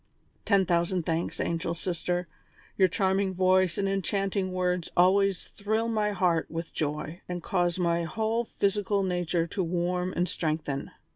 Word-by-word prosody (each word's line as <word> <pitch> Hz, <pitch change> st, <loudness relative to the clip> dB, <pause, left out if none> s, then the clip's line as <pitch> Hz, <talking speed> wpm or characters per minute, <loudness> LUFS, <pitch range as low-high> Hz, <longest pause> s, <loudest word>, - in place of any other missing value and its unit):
"Ten 200 Hz, -2 st, +4 dB
thousand 175 Hz, 0 st, +1 dB
thanks, 165 Hz, +1 st, -1 dB
angel 170 Hz, 0 st, -1 dB
sister; 175 Hz, 0 st, -2 dB, 0.5 s
your 190 Hz, -, +5 dB
charming 190 Hz, 0 st, +1 dB
voice 185 Hz, -1 st, +3 dB
and 195 Hz, -, +1 dB
enchanting 195 Hz, 0 st, -1 dB
words 180 Hz, -1 st, -1 dB
always 190 Hz, +1 st, +4 dB
thrill 220 Hz, +3 st, -2 dB
my 215 Hz, -2 st, +1 dB
heart 180 Hz, -4 st, +1 dB
with 165 Hz, 0 st, -5 dB
joy, 150 Hz, +2 st, -3 dB
and 175 Hz, -1 st, -4 dB
cause 175 Hz, -2 st, +1 dB
my 170 Hz, -1 st, +1 dB
whole 225 Hz, +5 st, 0 dB
physical 200 Hz, -2 st, 0 dB
nature 175 Hz, -2 st, 0 dB
to 180 Hz, +3 st, -3 dB
warm 180 Hz, +1 st, -1 dB
and 175 Hz, +1 st, 0 dB
strengthen. 155 Hz, -4 st, -2 dB
180 Hz, 145 wpm, -28 LUFS, 170-195 Hz, 0.5 s, your